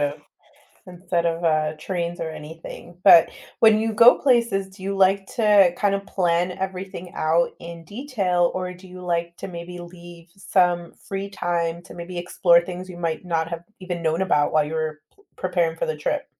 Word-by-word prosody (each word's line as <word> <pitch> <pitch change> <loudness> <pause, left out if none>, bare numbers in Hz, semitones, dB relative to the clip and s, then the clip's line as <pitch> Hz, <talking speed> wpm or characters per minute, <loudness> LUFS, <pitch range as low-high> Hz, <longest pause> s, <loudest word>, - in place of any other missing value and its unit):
of 145 0 -2 0.7
instead 175 -1 -2
of, 165 +1 -2
uh, 155 -1 +1
trains 175 -1 -3
or 160 - -3
anything. 160 +2 -10
But 165 - +8 0.3
when 220 -1 +6
you 220 0 -1
go 230 +3 +7
places, 235 -7 +2
do 190 0 -16
you 195 0 -3
like 195 0 +3
to 205 -6 +5
kinda 200 -1 +1
plan 175 -1 +1
everything 190 -1 -5
out 165 +2 +2
in 170 -1 -9
detail, 200 - 0
or 185 0 -3
do 180 +1 -14
you 180 0 -11
like 170 -1 -2
to - - -7
maybe 175 0 -8
leave 175 -1 -12
some 175 -3 +1
free 195 0 -6
time 170 -3 -2
to - - -13
maybe 175 +1 -7
explore 175 0 +4
things 185 +1 -7
you 175 - -9
might 165 0 -3
not 165 -2 -1
have 170 0 -5 0.2
even 175 -2 -5
known 160 +3 0
about 150 -6 +2
while 155 -1 +3
you 155 +2 -5
were 155 -1 -3
pl 405 - -27
preparing 175 -3 0
for - - -2
the 155 - -2
trip? 150 - -2
175 Hz, 185 wpm, -23 LUFS, 170-190 Hz, 0.7 s, But